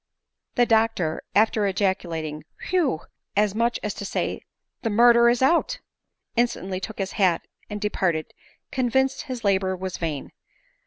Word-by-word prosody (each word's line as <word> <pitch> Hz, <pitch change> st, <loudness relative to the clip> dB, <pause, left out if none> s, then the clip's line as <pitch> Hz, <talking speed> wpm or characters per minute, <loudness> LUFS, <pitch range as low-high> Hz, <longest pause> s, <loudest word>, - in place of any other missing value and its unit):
The 245 Hz, -, +5 dB
doctor, 220 Hz, -8 st, +2 dB
after 215 Hz, -1 st, +3 dB
ejaculating 170 Hz, -5 st, -1 dB
" -, -, -11 dB
Whew 315 Hz, -, +2 dB, 0.2 s
!" -, -, -17 dB
as 205 Hz, -2 st, -1 dB
much 235 Hz, +2 st, +1 dB
as 210 Hz, -, -2 dB
to -, -, -7 dB
say 195 Hz, -, -2 dB, 0.2 s
" -, -, -58 dB
The 225 Hz, -, -1 dB
murder 235 Hz, +2 st, +6 dB
is 240 Hz, +1 st, +2 dB
out," 340 Hz, -, +3 dB, 0.6 s
instantly 210 Hz, -6 st, 0 dB
took 215 Hz, +3 st, -6 dB
his 195 Hz, -1 st, -2 dB
hat 180 Hz, -3 st, +3 dB, 0.2 s
and 210 Hz, -, -4 dB
de 210 Hz, 0 st, 0 dB
parted, 165 Hz, -4 st, -1 dB, 0.4 s
convinced 265 Hz, 0 st, +1 dB
his 255 Hz, -4 st, -5 dB
labor 190 Hz, -2 st, +2 dB
was 185 Hz, 0 st, -5 dB
vain. 155 Hz, -4 st, -3 dB
210 Hz, 160 wpm, -24 LUFS, 185-235 Hz, 0.6 s, murder